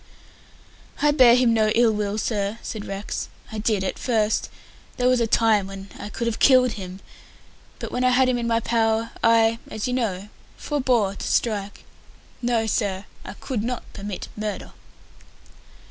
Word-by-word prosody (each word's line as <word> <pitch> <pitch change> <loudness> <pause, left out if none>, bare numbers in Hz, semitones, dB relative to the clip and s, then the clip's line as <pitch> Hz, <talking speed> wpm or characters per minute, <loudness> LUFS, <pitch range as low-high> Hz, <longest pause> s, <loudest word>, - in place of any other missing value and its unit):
"I 295 0 +4
bear 255 -5 +7
him 245 -2 +3
no 215 -1 +3
ill 235 -1 +5
will, 210 -1 -2
sir," 205 -1 -1
said 215 -3 -5
Rex. 195 +1 -5 0.2
"I 220 - -4
did 210 -2 0
at 190 - -3
first. 220 -3 0 0.5
There 250 - +2
was 255 -1 +4
a 230 - +1
time 220 -3 +3
when 195 0 -9
I 205 - -6
could 235 +3 -4
have 230 -1 -2
killed 255 -2 +5
him, 190 -2 -8 0.8
but - - -6
when 250 - -1
I 255 - +5
had 255 +1 +4
him 250 -1 +1
in 235 - -2
my 230 0 +2
power, 225 0 +1
I 230 0 +4
as 215 - -3
you 250 - -1
know 210 -5 -2 0.3
forbore 250 -9 0
to - - -5
strike. 205 -3 -1 0.6
No, 235 -2 +1
sir, 200 -3 -1 0.2
I - - -8
could 235 +1 -4
not 245 +1 -3
commit 200 -2 -6
murder!" 210 -1 -5
225 Hz, 170 wpm, -23 LUFS, 205-245 Hz, 0.8 s, bear